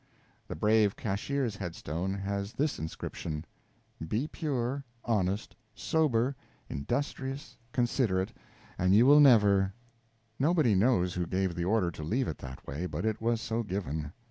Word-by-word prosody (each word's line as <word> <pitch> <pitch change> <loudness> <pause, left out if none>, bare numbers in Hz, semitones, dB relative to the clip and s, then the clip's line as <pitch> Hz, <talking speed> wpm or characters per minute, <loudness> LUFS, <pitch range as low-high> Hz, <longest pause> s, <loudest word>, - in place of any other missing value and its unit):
The - - -5
brave 105 -1 +3
cashier's 115 +2 -2
head 85 -3 -5
stone 90 +6 -3
has 100 +1 -3
this 150 +1 -1
inscription: 80 0 -5 0.6
"Be 115 - -1
pure, 140 -4 -2 0.2
honest, 100 -2 0 0.2
sober, 130 +2 +1 0.3
industrious, 135 - -3 0.2
considerate, 115 -7 +1 0.5
and 90 +2 +4
you 115 +4 +7
will 145 +2 +8
never 100 -8 +5 0.3
" - - -38 0.3
Nobody 150 -5 +3
knows 95 -3 +3
who 90 -1 -2
gave 95 0 0
the 85 +1 -2
order 95 -3 +2
to 75 - -8
leave 120 - 0
it 80 - -4
that 65 0 -9
way, 80 +6 -3
but - - -4
it 110 -1 -1
was 115 0 +1
so 115 +1 -1
given. 80 -8 -3
105 Hz, 145 wpm, -30 LUFS, 90-125 Hz, 0.6 s, will